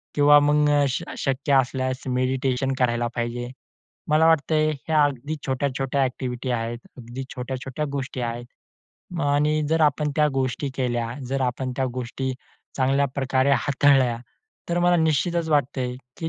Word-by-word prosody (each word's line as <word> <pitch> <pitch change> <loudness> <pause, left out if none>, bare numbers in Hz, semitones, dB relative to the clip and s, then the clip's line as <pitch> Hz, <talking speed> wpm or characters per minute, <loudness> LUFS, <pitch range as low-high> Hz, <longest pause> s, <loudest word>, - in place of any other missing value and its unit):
किंवा 145 0 +7
मग 150 0 +3 0.2
श 130 - -2
शक्य 135 +1 -1
असल्यास 130 0 +1
मेडिटेशन 130 +1 0
करायला 120 -1 +1
पाहिजे. 120 +1 -3 0.6
मला 155 +1 +4
वाटतंय 155 0 +3
हे 155 +2 -6
अगदी 145 0 +1
छोट्या-छोट्या 135 0 -1
ॲक्टिव्हिटी 125 -1 -3
आहेत. 115 0 -2 0.2
अगदी 120 +2 -7
छोट्या-छोट्या 130 +3 -4
गोष्टी 135 -2 -4
आहेत 120 0 -6 0.6
आणि 150 +2 +2
जर 160 +1 +1
आपण 150 0 +2
त्या 150 0 +4
गोष्टी 135 +1 -1
केल्या, 120 -3 -1 0.2
जर 135 0 -1
आपण 130 +1 -2
त्या 135 - +1
गोष्टी 130 +1 -3 0.4
चांगल्या 135 +1 +2
प्रकारे 135 0 +1
हाताळल्या, 135 -4 +3 0.5
तर 175 - 0
मला 175 0 +4
निश्चितच 160 +1 +1
वाटतंय 130 -4 0 0.2
की 165 - -3
135 Hz, 135 wpm, -24 LUFS, 125-145 Hz, 0.6 s, किंवा